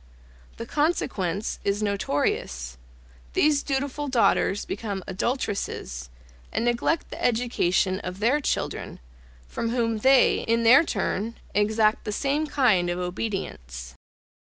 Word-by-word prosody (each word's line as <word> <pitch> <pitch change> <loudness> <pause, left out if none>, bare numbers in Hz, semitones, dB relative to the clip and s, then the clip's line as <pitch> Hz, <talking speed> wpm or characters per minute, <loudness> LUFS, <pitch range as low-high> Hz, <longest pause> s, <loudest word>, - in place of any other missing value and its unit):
The 230 - -5
consequence 225 - -1
is 200 +1 0
notorious; 65 - -1 0.5
these 295 -2 +3
dutiful 280 +1 -2
daughters 230 -5 +2
become 200 -2 -4
adulteresses, 190 - -3 0.4
and 230 - -1
neglect 240 +7 0
the - - -7
education 200 -6 +1
of 180 -1 -6
their 235 +8 +2
children, - - -3 0.5
from 230 - -3
whom 230 -2 0
they, 265 +3 +5
in 230 +1 +2
their 250 +7 +8
turn, 225 - -2 0.2
exact 215 +1 +2
the 210 - -2
same 285 +7 0
kind 220 -12 +3
of 175 - -1
obedience. 175 - -4
220 Hz, 115 wpm, -25 LUFS, 185-255 Hz, 0.5 s, their